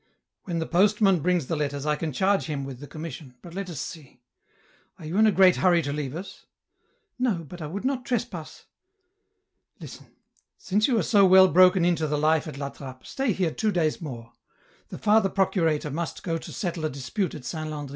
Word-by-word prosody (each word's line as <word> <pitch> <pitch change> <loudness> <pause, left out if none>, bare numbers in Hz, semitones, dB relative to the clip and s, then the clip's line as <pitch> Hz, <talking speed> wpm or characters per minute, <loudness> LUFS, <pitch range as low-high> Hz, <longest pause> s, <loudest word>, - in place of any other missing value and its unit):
" - - -62
When 175 -3 -3
the 165 - -1
postman 195 +1 +3
brings 175 -1 +1
the 165 - -2
letters 145 -1 -3
I 150 0 +1
can 155 +1 -3
charge 195 +8 +1
him 145 -3 -3
with 135 -2 -8
the 145 - -9
commission, 155 -4 -8
but 170 - -11
let 195 0 -5
us 160 -6 -6
see; 145 -6 -8 0.8
are - - -11
you 160 +4 -5
in 220 - +6
a - - +4
great 190 -2 +5
hurry 175 -3 +3
to 140 - -3
leave 145 -2 -4
us? 190 +3 -9 0.2
" - - -46
" 435 - -47
No, 210 -10 0
but 175 +3 -10
I 155 - -4
would 200 +9 -6
not 265 -1 -1
trespass... 235 -10 -4 0.4
." 400 +2 -51
" 385 - -50
Listen, - - -11 0.5
since 210 +3 +1
you 250 -4 +2
are - - +2
so 205 -3 +4
well 190 0 +7
broken 180 +1 +5
in 175 0 +3
to 155 - -1
the 150 0 -1
life 155 +1 +2
at 150 - -7
La 140 0 -4
Trappe, 130 -2 -11
stay 270 -3 -1
here 180 -4 0
two 215 +5 -1
days 165 -4 0
more. 120 -7 -8 0.6
The - - -7
Father 210 -2 +3
procurator 165 -7 0
must 165 +1 -4
go 165 -2 -2
to - - -10
settle 175 -4 -4
a 155 - 0
dispute 140 +8 -3
at 140 -5 -9
Saint 155 +2 -4
Landry. 145 -2 -6
170 Hz, 225 wpm, -26 LUFS, 150-195 Hz, 0.8 s, well